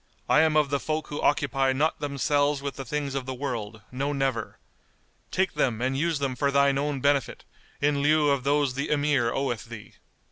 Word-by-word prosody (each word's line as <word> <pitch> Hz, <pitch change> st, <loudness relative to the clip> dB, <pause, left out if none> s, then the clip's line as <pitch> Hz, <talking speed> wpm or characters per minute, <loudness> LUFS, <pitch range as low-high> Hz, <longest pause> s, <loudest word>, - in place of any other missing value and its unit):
I 155 Hz, -, +5 dB
am 155 Hz, -1 st, +3 dB
of 150 Hz, -2 st, +2 dB
the 140 Hz, -, +1 dB
folk 155 Hz, +1 st, -3 dB
who 145 Hz, -, -4 dB
occupy 135 Hz, -2 st, +2 dB
not 150 Hz, +4 st, 0 dB
themselves 145 Hz, 0 st, +1 dB
with 140 Hz, 0 st, -5 dB
the 135 Hz, -, -7 dB
things 145 Hz, +2 st, -3 dB
of 135 Hz, -2 st, -3 dB
the 130 Hz, -, -4 dB
world, 115 Hz, -5 st, -5 dB
no 140 Hz, +3 st, -2 dB
never! 135 Hz, -5 st, -2 dB, 0.7 s
Take 190 Hz, -1 st, 0 dB
them 115 Hz, -4 st, 0 dB
and 130 Hz, +2 st, 0 dB
use 165 Hz, +3 st, 0 dB
them 135 Hz, -2 st, -2 dB
for 140 Hz, +3 st, +1 dB
thine 140 Hz, 0 st, +3 dB
own 145 Hz, -2 st, -2 dB
benefit, 140 Hz, 0 st, +1 dB, 0.4 s
in 145 Hz, 0 st, +2 dB
lieu 150 Hz, 0 st, +3 dB
of 140 Hz, -2 st, 0 dB
those 140 Hz, -1 st, +1 dB
the 140 Hz, +3 st, -3 dB
Emir 145 Hz, -5 st, +2 dB
oweth 120 Hz, -5 st, -2 dB
thee." 115 Hz, -3 st, -10 dB
140 Hz, 200 wpm, -26 LUFS, 130-145 Hz, 0.7 s, I